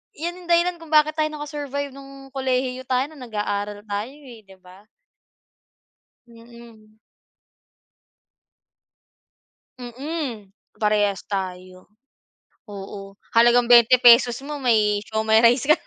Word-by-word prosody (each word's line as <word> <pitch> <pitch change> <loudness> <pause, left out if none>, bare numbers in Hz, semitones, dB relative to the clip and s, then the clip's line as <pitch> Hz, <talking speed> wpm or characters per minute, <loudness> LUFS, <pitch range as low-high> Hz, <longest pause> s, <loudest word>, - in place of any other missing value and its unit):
'yan 340 +3 -5
ang - - -15
dahilan 345 +1 +3
kung 325 -1 -13
bakit 305 0 +4
tayo 310 -1 +1
naka-survive 290 -1 -5
no'ng 275 0 -13
kolehiyo 260 -1 -2
tayo, 260 +2 0
no'ng 285 -5 -12
nag-aaral 205 -1 -4
tayo, 205 +5 -4
eh, 250 -7 -15
'di 195 -1 -17
ba? 185 +2 -18 1.4
Mm. 230 -2 -17 2.8
Mm, 250 -4 -6 0.2
parehas 205 -3 0
tayo, 185 -2 -6 0.8
oo, 195 0 -10 0.2
halagang 240 +1 +5
20 240 +1 +6
pesos 240 0 +6
mo 295 -1 -6
may 210 -4 +2
siomay 220 0 +2
rice 245 +3 +4
ka 305 - +6
na. - - -16
235 Hz, 115 wpm, -22 LUFS, 210-275 Hz, 2.8 s, 20